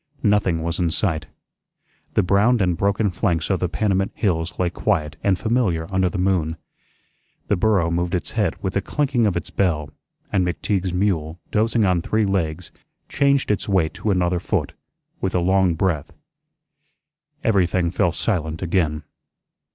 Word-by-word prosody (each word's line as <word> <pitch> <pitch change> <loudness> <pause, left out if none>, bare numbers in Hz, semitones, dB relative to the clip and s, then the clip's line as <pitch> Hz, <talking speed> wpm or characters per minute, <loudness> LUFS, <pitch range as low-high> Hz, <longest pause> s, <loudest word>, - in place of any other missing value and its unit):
Nothing 100 -6 +2
was 85 +2 -2
in 85 -2 +2
sight. 80 -2 -1 0.9
The - - +4
browned 105 +6 +3
and 90 -3 +2
broken 100 +2 +1
flanks 90 -2 0
of 95 - +1
the 90 - -1
Panamint 95 -1 0
hills 85 -5 -1
lay 90 -2 0
quiet 75 -8 -1
and 95 -2 +2
familiar 110 -9 0
under 95 -1 +2
the 95 - -5
moon. 90 -4 0 0.9
The - - +3
burro 95 -4 +2
moved 85 +2 0
its 90 - -3
head 105 -7 0
with 95 -1 -2
a 100 - +2
clinking 130 -1 +1
of 95 - 0
its - - -5
bell; 80 -6 0 0.4
and 95 - +3
McTeagues 90 +1 -1
mule, 90 -4 -1
dozing 110 0 +2
on 90 -2 +2
three 110 +4 +1
legs, 85 -3 -2 0.4
changed 140 -4 +2
its 105 - -2
weight 90 -5 +2
to 110 - -3
another 90 -2 +1
foot, - - -2 0.5
with 95 - -2
a - - +3
long 95 0 +2
breath. 80 -4 -1 1.3
Everything 90 -5 +2
fell 90 -1 +1
silent 80 -3 -2
again. 80 -4 0
90 Hz, 160 wpm, -22 LUFS, 85-100 Hz, 1.3 s, The